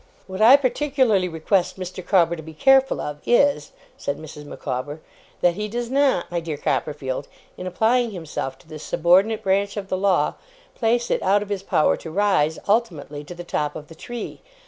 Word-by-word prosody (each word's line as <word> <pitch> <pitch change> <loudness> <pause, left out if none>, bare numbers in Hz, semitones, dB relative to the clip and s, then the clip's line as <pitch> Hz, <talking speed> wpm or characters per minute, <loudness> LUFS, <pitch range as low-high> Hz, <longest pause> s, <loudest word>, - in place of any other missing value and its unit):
'What 190 +2 -6
I 245 +6 +9
particularly 260 -8 +1
request 180 +3 0
Mr. 185 -1 -7
Micawber 175 -2 +2
to 160 - -8
be 160 0 -11
careful 270 - +4
of, 150 0 -5
is,' 240 - +2 0.3
said 140 - -3
Mrs. 150 -1 -10
Micawber, 145 +1 -5 0.4
'that 175 - +4
he 210 +4 -4
does 240 +2 -4
not, 275 -11 +2
my 175 - 0
dear 160 -3 -5
Mr. - - -21
Copperfield, 145 -2 -2 0.3
in 185 - -6
applying 230 +6 +2
himself 160 -8 -5
to - - -23
this 155 -1 -9
subordinate 190 +9 +2
branch 200 +2 +1
of 195 -1 -5
the 185 - 0
law, 195 -2 +2 0.4
place 235 +1 0
it - - +1
out 200 +2 +3
of 205 - -12
his 200 -2 -2
power 195 - +2
to 165 - -9
rise, 160 -4 +2
ultimately, 170 -10 -1
to 175 +4 -10
the 175 - -7
top 150 -3 -2
of 150 - -9
the - - -10
tree. 240 +8 -7
185 Hz, 190 wpm, -23 LUFS, 155-220 Hz, 0.4 s, I